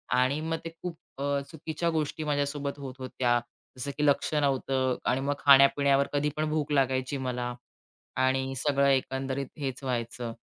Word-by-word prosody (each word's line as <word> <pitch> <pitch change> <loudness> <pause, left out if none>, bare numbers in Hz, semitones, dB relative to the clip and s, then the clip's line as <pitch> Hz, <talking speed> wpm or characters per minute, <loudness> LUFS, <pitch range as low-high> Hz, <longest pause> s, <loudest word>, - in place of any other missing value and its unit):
आणि 130 +4 +2
मग 165 +1 -1
ते - - -3
खूप 175 -2 -5 0.2
अ, 140 0 +1
चुकीच्या 160 +1 -2
गोष्टी 155 0 -2
माझ्यासोबत 145 -1 -1
होत 135 -2 -6
होत्या. 125 -2 +1 0.4
जसं 140 +3 -3
की 150 - +1
लक्ष 145 +2 +2
नव्हतं 135 -3 +1 0.2
आणि 130 +2 0
मग 140 +1 0
खाण्यापिण्यावर 140 0 +6
कधी 145 +1 +1
पण 155 0 0
भूक 155 -1 -1
लागायची 130 -1 +1
मला 125 -2 -3 0.6
आणि 130 +1 +1
सगळं 140 +1 +2
एकंदरीत 135 0 0
हेच 135 -2 -4
व्हायचं. 120 -2 -3
140 Hz, 155 wpm, -28 LUFS, 130-145 Hz, 0.6 s, खाण्यापिण्यावर